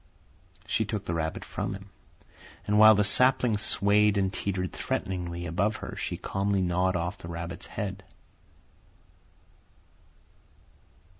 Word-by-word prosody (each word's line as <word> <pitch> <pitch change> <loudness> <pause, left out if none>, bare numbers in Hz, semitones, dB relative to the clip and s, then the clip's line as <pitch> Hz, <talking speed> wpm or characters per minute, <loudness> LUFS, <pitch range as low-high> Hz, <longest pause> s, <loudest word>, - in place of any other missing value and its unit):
She 110 - 0
took 105 -2 -4
the 85 - -3
rabbit 80 -1 -3
from - - -4
him, 100 0 -12 0.7
and 105 +1 +2
while 110 0 +9
the 105 - +3
sapling 125 +1 +4
swayed 105 0 +2
and 95 -1 0
teetered 95 -2 -3
threateningly 85 -2 -3
above 100 +6 0
her - - -7
she - - -4
calmly 100 0 -1
gnawed 90 +1 +1
off 90 +3 -3
the - - -9
rabbit's 85 +1 -6
head. 95 -2 -5
95 Hz, 125 wpm, -27 LUFS, 90-105 Hz, 0.7 s, while